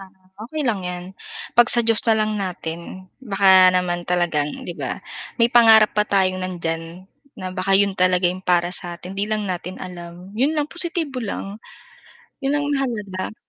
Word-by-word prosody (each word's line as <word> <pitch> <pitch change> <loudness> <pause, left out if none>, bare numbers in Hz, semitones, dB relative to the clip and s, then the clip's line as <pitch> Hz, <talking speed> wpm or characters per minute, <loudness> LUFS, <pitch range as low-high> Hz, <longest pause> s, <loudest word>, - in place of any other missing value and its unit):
Ah, 195 - -12 0.4
okey 305 0 -3
lang 220 -6 0
'yan 180 0 -6 0.5
'pag 240 0 +5
sa 235 -1 +8
Diyos 225 -1 +4
na 220 - +4
lang 215 0 0
natin 180 0 -7
baka 195 -5 +5
naman 175 -1 -2
talagang 175 -5 0 0.2
'di 175 - -5
ba? - - -6 0.3
May 235 0 +2
pangarap 225 -3 +6
pa 210 0 0
tayong 185 -2 +1
nandiyan 170 -1 -5 0.3
na 185 0 -6
baka 190 +1 +1
'yun 200 0 +2
talaga 185 -1 +1
yung 180 +1 0
para 175 -1 +1
sa 175 -2 -4
atin, 180 +2 -10
'di 200 +2 -3
lang 215 -1 -1
natin 180 -1 -5
alam, 180 +1 -10
'yun 270 +9 0
lang 300 - +1
positibo 330 -4 -4
lang. 205 -1 -6 0.8
'Yun 270 - +1
ang 290 0 -1
mahalaga. 220 -9 -3
190 Hz, 175 wpm, -21 LUFS, 180-225 Hz, 0.8 s, sa